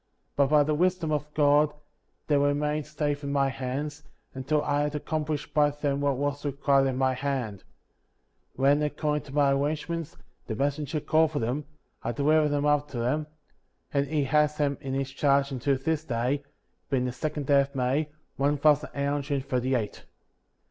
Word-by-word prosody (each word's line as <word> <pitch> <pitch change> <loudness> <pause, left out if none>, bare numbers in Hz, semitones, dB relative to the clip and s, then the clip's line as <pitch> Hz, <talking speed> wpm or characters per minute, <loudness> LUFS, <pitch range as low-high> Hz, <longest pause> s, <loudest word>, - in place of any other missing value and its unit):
But 140 -1 +4
by 150 +1 +5
the 155 +1 0
Wisdom 175 0 +1
of 150 0 -2
God, 150 0 +4 0.5
they 150 - +2
remained 145 +1 +1
safe 150 -1 -2
in 140 - -3
my 140 -1 +2
hands, 135 +4 -4 0.3
until 140 +3 0
I 145 0 +1
had 150 0 -1
accomplished 150 0 -3
by 150 -1 +4
them 145 -1 -2
what 140 -2 +1
was 145 +1 -2
required 140 -1 +2
at 130 - -1
my 130 0 +2
hand. 125 -7 -3 0.9
When, 140 +3 +3
according 150 -1 -1
to 145 - 0
arrangements, 150 +4 0 0.3
the 110 - -3
'messenger 145 +4 -1
called 160 +1 +2
for - - -1
them, 130 +5 -1 0.4
I 120 - -2
delivered 150 +4 +3
them 145 0 0
up 150 0 +2
to 120 -5 -4
him; 150 +4 -1 0.7
and 140 0 +1
he 150 0 0
has 150 +2 +2
them 140 -2 0
in 135 -1 -3
his 135 0 -2
charge 140 0 +2
until 135 +1 0
this 155 +3 -1
day, 125 +1 -1 0.5
being 130 -2 +1
the 125 - -1
second 145 +3 -3
day 140 0 +5
of 140 0 -5
May, 135 +4 0 0.3
one 145 +2 +2
thousand 150 +1 +3
eight 140 0 -1
hundred 145 0 -2
and 135 -1 -1
thirty 130 0 0
eight. 110 -4 -3
145 Hz, 180 wpm, -27 LUFS, 135-150 Hz, 0.9 s, by